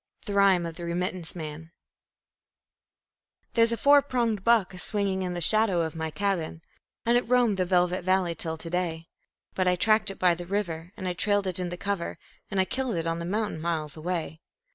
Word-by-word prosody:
The 205 - -4
Rhyme 195 -3 +4
of 165 -1 -6
the 175 - -7
Remittance 175 0 -2
Man 160 -1 -7 1.8
There's 230 0 +4
a 230 - -1
four 285 +5 +6
pronged 235 -7 -1
buck 225 -5 +3
a 180 - -8
swinging 200 -1 0
in 180 -1 -3
the 175 - -3
shadow 205 0 +4
of 160 -1 -4
my 160 0 -3
cabin, 170 -3 -2 0.4
And 235 +1 +4
it 245 - -9
roamed 245 -5 +3
the 185 - +1
velvet 180 0 +1
valley 185 -1 +2
till 160 0 -4
to 165 - -8
day; 170 -2 -2 0.5
But 185 -1 0
I 180 - +4
tracked 215 +2 +2
it 195 - -7
by 180 -1 +4
the 175 0 -7
river, 175 -4 -3
and 185 - -4
I 180 - -1
trailed 205 +2 +1
it 185 -1 -2
in 180 -1 -2
the 175 - -6
cover, 200 -2 -3 0.3
And 195 - -1
I 190 - +4
killed 260 0 -2
it 165 -1 -2
on 165 0 -1
the 170 - -4
mountain 205 -3 -2
miles 160 -3 -2
away. 160 -1 -4
185 Hz, 210 wpm, -27 LUFS, 170-205 Hz, 1.8 s, four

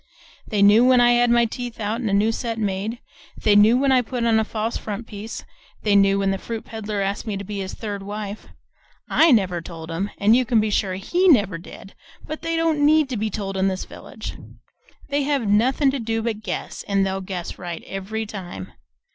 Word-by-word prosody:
They 205 -3 +1
knew 210 +4 +7
when 255 0 +5
I 240 0 +5
had 240 0 +4
my 235 0 +4
teeth 240 0 -6
out 220 +3 -2
and 225 - -1
a - - -1
new 210 +3 +3
set 230 0 -3
made; 210 +2 -2 0.5
they 210 -2 +4
knew 215 +4 +6
when 275 +1 +2
I 255 -1 +5
put 245 0 -4
on 225 -1 +4
a - - +2
false 220 +1 -3
front 215 +2 -5
piece; 215 0 -7 0.4
they 210 -2 +3
knew 195 0 +5
when 195 -1 +1
the 195 - -2
fruit 225 +1 -6
peddler 215 -2 -4
asked 200 +3 -3
me 205 -2 -2
to 200 - -5
be 205 0 -5
his 190 -1 -5
third 205 -3 -5
wife 205 +1 -6 0.6
I 325 - +5
never 185 -7 +2
told 165 -1 -9
'em, 190 +5 -2
an' 210 +2 +4
you 255 +2 +4
can 235 -2 +2
be 215 0 0
sure 195 -2 0
HE 350 - +1
never 205 - +4
did, 190 +2 -12 0.3
but 310 +1 -6
they 330 0 -2
don't 325 -3 +1
NEED 305 -1 +4
to 250 - -3
be 215 +1 -1
told 195 -1 -4
in 190 0 +1
this 185 -1 -2
village; - - -9 0.8
they 285 0 +1
have 275 -5 0
nothin' 255 +7 +3
to 275 - -3
do 225 -1 -2
but 220 -2 -2
guess, - - -5
an' 195 -1 +2
they'll 195 0 -2
guess 185 -2 -6
right 175 -2 -6
every 210 +3 -4
time. 180 - -8
215 Hz, 225 wpm, -22 LUFS, 195-240 Hz, 0.8 s, knew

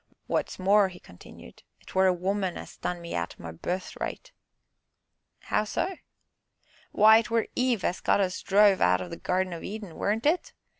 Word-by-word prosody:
"Wot's - - -1
more," 200 +2 +4
he 180 -1 -12
continued, 90 -7 -15 0.2
"'twere 190 0 +2
a - - +5
woman 190 +1 -2
as - - -9
done 180 -1 -4
me 170 - -7
out 85 0 -3
o' - - -12
my 80 - -6
birthright." 180 - -5 1.1
"How 210 - 0
so?" 360 - -2 1.0
"Why, 220 +2 +7
'twere 230 0 0
Eve 250 -5 +1
as 180 - -1
got - - +2
us 185 -2 -1
druv 200 -1 +4
out 90 +1 +4
o' 90 - -5
the - - -7
Gardin 185 0 -1
o' 170 - -7
Eden, 205 -4 -7
weren't 215 +4 -1
it? 360 +11 +1
190 Hz, 170 wpm, -27 LUFS, 180-215 Hz, 1.1 s, Why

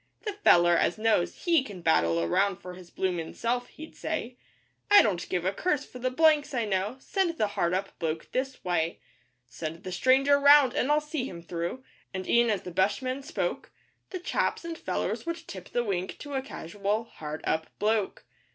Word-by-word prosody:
'The 420 -3 -3
feller 175 0 +6
as 175 - +1
knows, 215 -5 0
he 335 -6 +4
can 200 -7 -9
battle 85 - +2
around 195 - +2
for 180 -2 -9
his 180 -1 -12
bloomin' 175 -4 -3
self,' 245 +1 -1
he'd 315 +1 -12
say 255 -6 -4 0.5
'I 410 - +9
don't 185 -6 -1
give 180 -1 -1
a 190 - +1
curse 300 - 0
for 250 - -11
the 255 +1 0
"blanks" 300 +1 +3
I 235 -2 +1
know 200 +3 -1
send 345 +2 -1
the 215 - +1
hard 175 -3 0
up 195 +1 -4
bloke 160 -1 -3
this 265 +1 -3
way; 170 -2 0 0.5
Send 155 +7 -7
the 185 - -6
stranger 270 +8 +4
round, 285 -2 +7
and 275 - +1
I'll 300 0 +4
see 300 -3 -3
him 170 -8 -8
through,' 175 +9 -4 0.3
and, 185 0 -4
e'en 235 0 +4
as 205 -4 0
the 180 - -7
bushman 255 +9 0
spoke, 300 +5 -3 0.4
The 375 - -4
chaps 355 -1 -1
and 335 -1 -4
fellers 330 - -3
would 335 -1 -4
tip 185 -2 -9
the 240 - 0
wink 190 -4 -3
to 290 -1 -8
a 265 - 0
casual, 205 - -3
'hard 155 -8 -7
up 160 0 0
bloke. 215 -1 0
215 Hz, 195 wpm, -28 LUFS, 180-280 Hz, 0.5 s, I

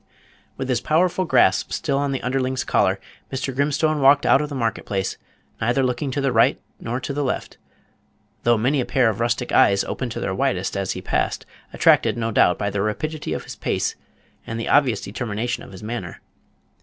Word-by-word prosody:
With 130 - -3
his 125 -2 0
powerful 180 +4 +1
grasp 120 - +3
still 140 -4 -1
on 140 -1 0
the 135 - -3
underling's 130 0 -1
collar, 95 +1 +1 0.3
Mr. 135 -1 -3
Grimstone 150 +2 +1
walked 140 +1 +5
out 140 - +5
of 150 - -3
the 145 - -5
market 115 -4 -1
place, 95 -1 -2 0.5
neither 120 +4 +2
looking 130 +3 -1
to 130 - -2
the 135 -1 +1
right 115 -1 +3 0.2
nor 120 +2 -3
the 140 +2 -3
left, 130 - -3 0.8
though 120 0 +3
many 130 +5 +1
a - - -2
pair 125 -4 +3
of 105 - -8
rustic 120 +1 -1
eyes 100 0 +4
opened - - -4
to - - -5
their - - -2
widest - - -1
as - - -1
he - - -7
passed, - - -1 0.3
attracted - - +3
no 115 -1 -1
doubt 90 -4 +4
by 100 0 -2
the 100 - -1
rapidity 150 +9 -3
of - - -4
his - - -9
pace - - -1 0.5
and 115 0 -4
the 115 - -3
obvious 130 -8 +3
determination 115 +2 -3
of - - -11
his 95 +1 -11
manner. 120 +2 -5
125 Hz, 195 wpm, -22 LUFS, 115-140 Hz, 0.8 s, walked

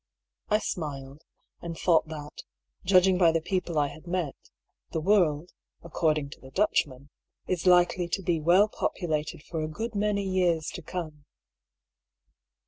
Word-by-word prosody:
I 210 - +4
smiled, 140 -7 -5 0.4
and 170 -1 -6
thought 165 -3 +3
that, 150 -2 -8 0.4
judging 185 0 +4
by 170 -3 +6
the 165 - +1
people 180 -1 -2
I 145 -1 +2
had 155 +4 -13
met, 175 -5 -1 0.6
the 160 - -2
world 175 -3 +2 0.3
(according 155 -3 0
to - - -12
the 130 - -12
Dutchman) 140 -5 0 0.3
is 185 0 -2
likely 180 0 +4
to 190 +3 -2
be 170 -3 +1
well 175 +7 +5
populated 155 -7 -3
for 165 -2 -4
a 155 - -2
good 225 +8 -5
many 200 -1 0
years 175 -4 +1
to - - -7
come. 155 -3 -6
170 Hz, 145 wpm, -27 LUFS, 155-185 Hz, 0.6 s, by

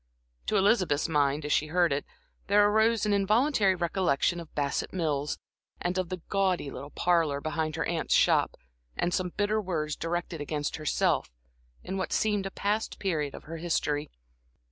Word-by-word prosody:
To 210 - +2
Elizabeth's 190 -8 +3
mind, 145 -1 +1
as 150 - +1
she 155 - +2
heard 175 -1 +2
it, 140 - -2 0.4
there 205 +1 +5
arose 220 +1 +3
an 210 - +2
involuntary 205 +1 +3
recollection 175 -2 +1
of 165 -2 -10
Bassett 140 -1 -1
Mills, 150 -5 -1 0.4
and 175 +1 -1
of 180 -2 -2
the 185 -2 -5
gaudy 185 -7 0
little 140 - -7
parlor 165 -4 +1
behind 155 0 -2
her - - -1
aunt's - - 0
shop, - - +3 0.4
and 175 - 0
some 185 -1 0
bitter 210 +1 +1
words 155 -6 -2
directed 170 -1 -3
against 145 0 -3
herself, 155 -1 +1 0.5
in 190 - -4
what 190 - -3
seemed 205 -3 +1
a - - -4
past 210 +3 -2
period 155 -7 -1
of - - -10
her 165 +2 -7
history. 155 -3 -1
175 Hz, 165 wpm, -28 LUFS, 150-195 Hz, 0.5 s, there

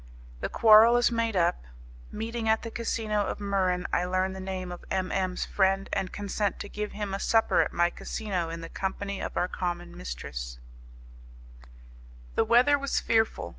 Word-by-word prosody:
The - - -3
Quarrel 225 +2 +7
is 240 0 +3
Made 230 -2 0
Up 170 - +1 0.5
Meeting 225 +1 -3
at 220 - +2
the 230 - -6
Casino 220 -3 -1
of - - -3
Muran 190 -3 0
I - - +2
Learn 185 +1 0
the 190 - -7
Name 185 -1 -5
of 175 - -8
M. 185 -1 -1
M.'s 185 -1 -1
Friend, 195 0 +1
and 190 -2 -1
Consent 205 0 -2
to - - -6
Give 210 +1 -5
Him 205 -2 -4
A 195 - -2
Supper 225 +2 +3
at - - -1
My 175 0 +2
Casino 185 -6 -3
in 165 0 -6
the 165 - -7
Company 200 +1 -4
of - - -5
Our 180 - +2
Common 175 -1 -4
Mistress - - -6 1.8
The - - +2
weather 255 +5 +5
was 280 0 0
fearful. 225 -1 +1
195 Hz, 175 wpm, -28 LUFS, 180-220 Hz, 1.8 s, Quarrel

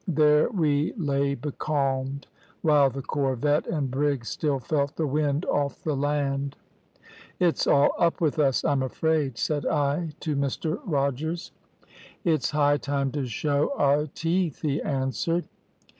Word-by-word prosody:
There 150 -2 +4
we 155 -7 +1
lay 140 - 0
becalmed, 140 -1 -2 0.4
while 150 -3 +5
the 135 +1 -6
corvette 145 +2 0
and 145 -5 -1
brig 140 -2 0
still 145 +2 -1
felt 140 +1 -1
the 160 - 0
wind 145 +2 0
off 145 -1 -1
the 155 -2 0
land. 140 -1 -1 0.8
"`It's 175 -3 +2
all 140 0 +5
up 170 -1 +2
with 155 -2 0
us, 135 -3 +2
I'm 140 -4 +2
afraid,' 140 -1 0
said 145 +4 -1
I 150 +3 0
to 155 -2 -1
Mr 140 +5 -1
Rogers. 160 - -1 0.7
"`It's 155 -5 +2
high 145 -1 +3
time 140 -2 -1
to 140 -2 -2
show 145 - 0
our 145 +2 +3
teeth,' 165 +1 -1
he 145 -1 0
answered. 135 +5 -1
145 Hz, 140 wpm, -26 LUFS, 140-155 Hz, 0.8 s, while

